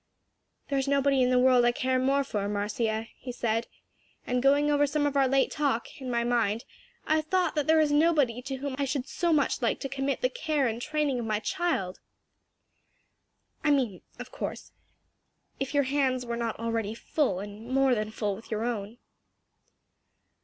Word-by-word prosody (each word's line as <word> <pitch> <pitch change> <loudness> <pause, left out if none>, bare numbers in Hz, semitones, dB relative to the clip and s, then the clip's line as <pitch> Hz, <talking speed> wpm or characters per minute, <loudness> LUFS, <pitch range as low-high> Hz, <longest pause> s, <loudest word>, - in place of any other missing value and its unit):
"There's 275 -1 0
nobody 275 -1 +3
in 250 - +3
the 255 - +3
world 250 -1 +5
I 240 - +4
care 255 +1 0
more 275 +2 +2
for, 205 -6 -3
Marcia," 220 +2 -1
he 255 - -6
said, 230 -1 -1 0.6
"and 250 0 0
going 285 +2 +4
over 290 0 +3
some 290 +1 0
of 290 -1 -1
our 275 -1 +4
late 270 +1 +2
talk, 280 -3 -2
in 260 - -5
my 235 -1 +1
mind, 230 -2 0 0.4
I 310 - +2
have 310 - -1
thought 365 +2 +1
there 315 +1 +3
is 305 -2 +3
nobody 290 -6 +3
to 270 +1 -5
whom 270 0 -4
I 280 - +1
should 275 0 -2
so 345 -1 0
much 295 -4 +2
like 235 - +1
to - - -2
commit 275 0 -2
the - - +2
care 310 - -1
and 230 0 -2
training 300 -3 0
of 230 - -4
my 215 -1 +1
child. 220 - -2 1.6
I 305 - +2
mean, 255 -10 +1 0.2
of - - -9
course, - - -6 0.9
if 270 +2 -3
your 285 - +4
hands 260 -2 0
were 235 0 -3
not 235 -1 -2
already 225 -2 -2
full 240 - -1
and 205 +3 -8
more 270 0 +3
than 215 -2 -1
full 210 -2 -2
with 225 - -13
your 220 0 -2
own." 225 -2 -3
260 Hz, 185 wpm, -28 LUFS, 230-285 Hz, 1.6 s, world